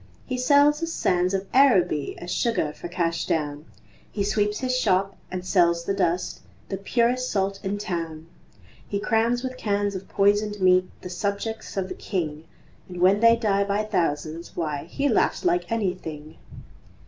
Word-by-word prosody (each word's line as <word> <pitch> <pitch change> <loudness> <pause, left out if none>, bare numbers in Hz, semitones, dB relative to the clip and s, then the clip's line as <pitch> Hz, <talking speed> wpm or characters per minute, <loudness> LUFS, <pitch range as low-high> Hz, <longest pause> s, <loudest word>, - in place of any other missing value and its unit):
He 255 - -3
sells 285 +4 +4
us 330 0 -2
sands 180 - +1
of 195 0 -2
Araby 185 - +3
As 175 - -7
sugar 185 -11 0
for 175 - -8
cash 170 -1 -1
down; 150 -1 -2 0.5
He 200 - -1
sweeps 210 +1 0
his 255 0 -1
shop 195 -5 +1
and 180 0 -5
sells 170 -3 +3
the 195 - 0
dust 180 -2 -1 0.3
The 195 - -2
purest 240 +5 +1
salt 195 0 -1
in 200 +1 -2
town, 165 -5 -4 0.6
He 200 - -2
crams 230 +3 +1
with 255 -1 -4
cans 205 -3 0
of 190 0 -7
poisoned 205 +1 +2
meat 185 0 +4
Poor 180 - -6
subjects 200 +4 -3
of 190 -1 0
the - - -5
King, 160 -4 -4 0.4
And 180 -1 -7
when 190 +3 +5
they 230 +1 +6
die 205 -4 +1
by 200 +1 0
thousands 165 -4 -2
Why, 150 -4 -3
he 275 +11 -1
laughs 285 - +1
like 355 -6 +1
anything. 180 -8 -3
195 Hz, 165 wpm, -25 LUFS, 175-225 Hz, 0.6 s, they